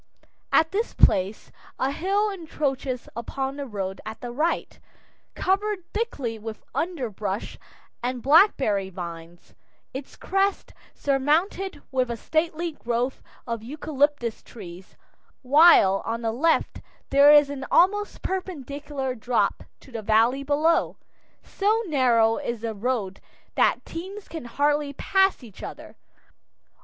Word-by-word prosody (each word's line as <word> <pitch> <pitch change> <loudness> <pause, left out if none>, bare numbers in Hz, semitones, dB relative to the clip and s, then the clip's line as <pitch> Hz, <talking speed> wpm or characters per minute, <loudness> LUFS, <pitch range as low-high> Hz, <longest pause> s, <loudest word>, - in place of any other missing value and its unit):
At 320 - +4
this 435 +5 -2
place 190 +3 +2 0.3
a 265 - 0
hill 400 +7 0
encroaches 280 -8 -3
upon 265 +4 -3
the 280 -1 -5
road 195 -4 -4
at 220 - -7
the 245 - -6
right, 310 +7 -1 0.6
covered 395 0 0
thickly 280 - -3
with 220 0 -8
underbrush 225 - -3 0.4
and 245 0 -3
blackberry 270 - +4
vines, 170 -1 -9 0.4
its 265 +1 -7
crest 390 +1 -1 0.2
surmounted 300 +5 0
with 255 -2 +1
a 235 - -3
stately 325 +4 -1
grove 245 -2 -2 0.2
of 230 -2 -3
eucalyptus 290 -1 -1
trees, 180 -4 -12 0.5
while 260 - +6
on 230 +1 -3
the 225 - 0
left 320 +7 +1 0.3
there 280 +1 +7
is 295 -1 +6
an 275 -2 -5
almost 415 +3 +2
perpendicular 290 -7 -4
drop 245 +1 0 0.2
to 265 - -16
the 230 -2 -5
valley 225 +5 +3
below. 295 +4 +1 0.5
So 430 +3 0
narrow 240 - +3
is 235 -6 -4
the 230 -1 -3
road 210 -3 -2 0.3
that - - +2
teams 380 +5 -7
can 320 -7 -7
hardly 290 +3 0
pass 385 +1 +2
each 215 -5 -13
other. - - -9
275 Hz, 125 wpm, -25 LUFS, 230-330 Hz, 0.6 s, there